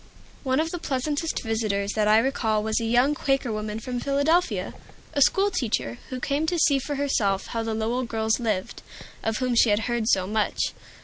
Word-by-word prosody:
One 260 0 +1
of 325 +1 0
the 350 - -4
pleasantest 295 +2 -2
visitors 215 -3 -1
that 215 -1 +1
I 215 +1 +6
recall 225 -3 +1
was 220 +1 0
a - - -2
young 245 +5 +3
Quaker 270 -4 0
woman 215 0 -4
from 245 +2 -4
Philadelphia, 285 +7 +1 0.4
a 285 - 0
school 395 +8 +4
teacher, 220 - -2
who 255 - -4
came 285 +5 -1
to 350 - 0
see 280 -4 +4
for 290 +2 -4
herself 220 -9 0
how 230 - -1
the 225 -1 -2
Lowell 235 +3 -1
girls 220 0 0
lived, 215 -6 -2 0.4
of 220 -1 -1
whom 255 -1 0
she 235 -1 +5
had 205 +1 +2
heard 235 -2 -1
so 190 -4 +3
much. 215 +2 -1
240 Hz, 195 wpm, -25 LUFS, 220-280 Hz, 0.4 s, I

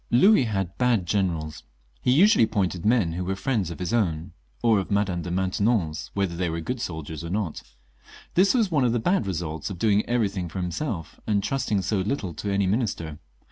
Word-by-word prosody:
Louis 160 - +5
had 95 -5 -3
bad 120 -7 +2
generals; 85 -6 -1 0.4
he - - 0
usually 190 - +6
appointed 95 -3 -1
men 110 -8 +3
who 90 +2 -3
were 95 +1 -2
Mends 110 -10 +1
of 85 - -6
his 90 +2 -3
own, 85 -8 0 0.3
or 115 -3 +4
of 95 - -4
Madame 100 -4 0
de 90 - -5
Maintenon's, 95 -3 0
whether 95 -4 0
they 90 0 -1
were 80 +1 -2
good 125 +8 -4
soldiers 80 -2 -5
or 85 - -5
not. 95 -4 -2 0.7
This 195 +7 +4
was 220 -7 +2
one 145 -5 +3
of 120 -2 +2
the 120 - +1
bad 175 - +1
results 80 -3 -3
of 95 - -6
doing 105 +2 +3
everything 100 -7 0
for 90 - -8
himself, 90 - -4
and 100 -2 +1
trusting 110 -6 0
so 100 +2 0
little 95 -2 -2
to 100 - -4
any 100 0 +2
minister. 95 - -1
100 Hz, 200 wpm, -25 LUFS, 85-115 Hz, 0.7 s, usually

